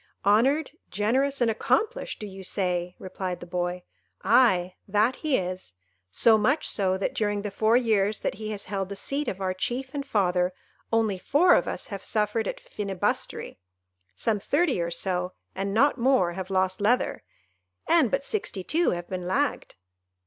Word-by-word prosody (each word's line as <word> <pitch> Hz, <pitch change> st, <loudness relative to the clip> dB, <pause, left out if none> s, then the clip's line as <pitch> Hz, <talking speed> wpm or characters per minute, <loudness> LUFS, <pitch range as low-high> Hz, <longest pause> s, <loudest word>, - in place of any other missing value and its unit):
"Honoured, 265 Hz, +10 st, +3 dB, 0.2 s
generous, 260 Hz, +7 st, +1 dB
and 235 Hz, -2 st, +4 dB
accomplished! 420 Hz, -, 0 dB
do 215 Hz, -, -5 dB
you 195 Hz, -1 st, -9 dB
say?" 180 Hz, -2 st, -1 dB
replied 185 Hz, -1 st, -5 dB
the -, -, -9 dB
boy: 175 Hz, 0 st, -3 dB, 0.4 s
"aye, 185 Hz, -8 st, +4 dB
that 215 Hz, +5 st, +2 dB
he 305 Hz, -4 st, +1 dB
is; 185 Hz, -, -5 dB, 0.4 s
so 220 Hz, -, +4 dB
much 275 Hz, +8 st, +1 dB
so, 190 Hz, -2 st, +1 dB
that 195 Hz, -, -2 dB
during 205 Hz, -1 st, -1 dB
the 205 Hz, -, -3 dB
four 220 Hz, +4 st, +3 dB
years 215 Hz, -4 st, +1 dB
that -, -, -1 dB
he 215 Hz, -, -4 dB
has 205 Hz, -2 st, -4 dB
held 195 Hz, -1 st, -3 dB
the 200 Hz, -, -5 dB
seat 280 Hz, +8 st, -2 dB
of 190 Hz, -, -3 dB
our 190 Hz, -1 st, -1 dB
chief 250 Hz, +8 st, -3 dB
and 285 Hz, -1 st, -3 dB
father, 180 Hz, -7 st, +1 dB, 0.4 s
only 220 Hz, -4 st, +1 dB
four 300 Hz, -, +4 dB
of -, -, +3 dB
us -, -, -4 dB
have 195 Hz, -, -6 dB
suffered 215 Hz, 0 st, 0 dB
at -, -, -4 dB
Finibusterry; 195 Hz, -, -3 dB, 0.6 s
some 210 Hz, -, 0 dB
thirty 285 Hz, -, +1 dB
or 170 Hz, -, -1 dB
so, 180 Hz, +1 st, -2 dB, 0.2 s
and 195 Hz, +1 st, -3 dB
not 270 Hz, +6 st, +3 dB
more, 245 Hz, -8 st, +3 dB
have 185 Hz, +1 st, -6 dB
lost 185 Hz, 0 st, 0 dB
leather; 235 Hz, +5 st, +1 dB, 0.7 s
and 325 Hz, -8 st, +4 dB
but 275 Hz, +3 st, -1 dB
sixty 330 Hz, -, -2 dB
two 335 Hz, -, +1 dB
have 175 Hz, 0 st, -3 dB
been 180 Hz, -1 st, -5 dB
lagged." 275 Hz, +9 st, -1 dB
205 Hz, 170 wpm, -26 LUFS, 185-250 Hz, 0.7 s, and